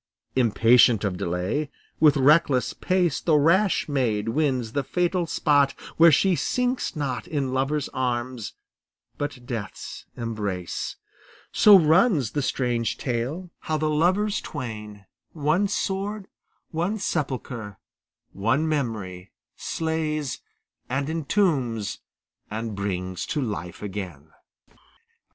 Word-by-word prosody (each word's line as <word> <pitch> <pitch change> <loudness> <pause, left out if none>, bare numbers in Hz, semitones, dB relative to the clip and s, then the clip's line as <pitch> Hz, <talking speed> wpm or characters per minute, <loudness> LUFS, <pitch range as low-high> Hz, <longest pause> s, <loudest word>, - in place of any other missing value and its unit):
Impatient 115 -2 +5
of 100 -3 -1
delay, 90 - -2 0.3
with 150 -2 +6
reckless 140 -1 +4
pace 180 -5 0
The 160 - +3
rash 175 +7 +3
maid 115 -7 0
wins 130 -4 0
the 140 +3 -1
fatal 175 +3 0
spot 145 -4 +3 0.2
where 165 0 +8
she 185 +5 +4
Sinks 250 +2 -1
not 130 -7 -3
in 135 -4 -2
lover's 135 +2 0
arms 125 -2 -3 0.6
but 140 -4 -4
death's 115 -7 -6
embrace. 105 -6 -3 0.6
So 210 -2 +8
runs 160 - +3
the 145 - -1
strange 120 -4 -1
tale, 135 +9 -3
how 155 - -2
the 155 0 0
lovers 185 +7 +2
twain 105 -7 -7 0.3
One 160 +6 +1
sword, 200 +1 -2 0.5
one 175 +7 -1
sepulchre, 130 - -3 0.6
one 130 +10 +1
memory, 110 - -3 0.2
Slays, 155 -3 -2 0.5
and 135 +4 -1
entombs, 140 - 0 0.5
and 110 +1 -4
brings 95 -2 -3
to 155 - -1
life 105 - -4
again. 90 -7 -6
135 Hz, 110 wpm, -25 LUFS, 110-160 Hz, 0.6 s, where